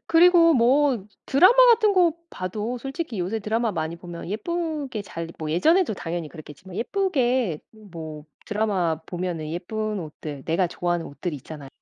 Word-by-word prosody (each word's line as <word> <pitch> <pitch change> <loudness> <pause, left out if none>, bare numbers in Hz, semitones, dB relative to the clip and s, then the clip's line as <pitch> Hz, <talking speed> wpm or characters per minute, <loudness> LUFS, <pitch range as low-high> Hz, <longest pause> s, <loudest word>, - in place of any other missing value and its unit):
그리고 335 0 +6
뭐 255 -2 +3 0.2
드라마 360 - +6 0.2
같은 435 -2 +3
거 355 -3 +5 0.2
봐도 210 +6 -4
솔직히 270 - -5
요새 185 +5 -1
드라마 220 +2 -1
많이 160 -1 -3
보면 170 -1 -8
예쁘게 300 - -3
잘 165 -4 -6
뭐 155 -1 -4
예전에도 315 - +3
당연히 170 -3 -4
그랬겠지만 160 +4 -11
예쁘게 255 - 0 0.3
뭐 155 -3 -8 0.2
드라마 195 -7 0
보면은 175 -4 -4
예쁜 215 +5 -3
옷들 150 -3 -7
내가 170 +3 +1
좋아하는 175 0 -2
옷들이 150 +2 -5
있잖아요. 145 +1 -10
200 Hz, 345 characters per minute, -24 LUFS, 165-270 Hz, 0.3 s, 그리고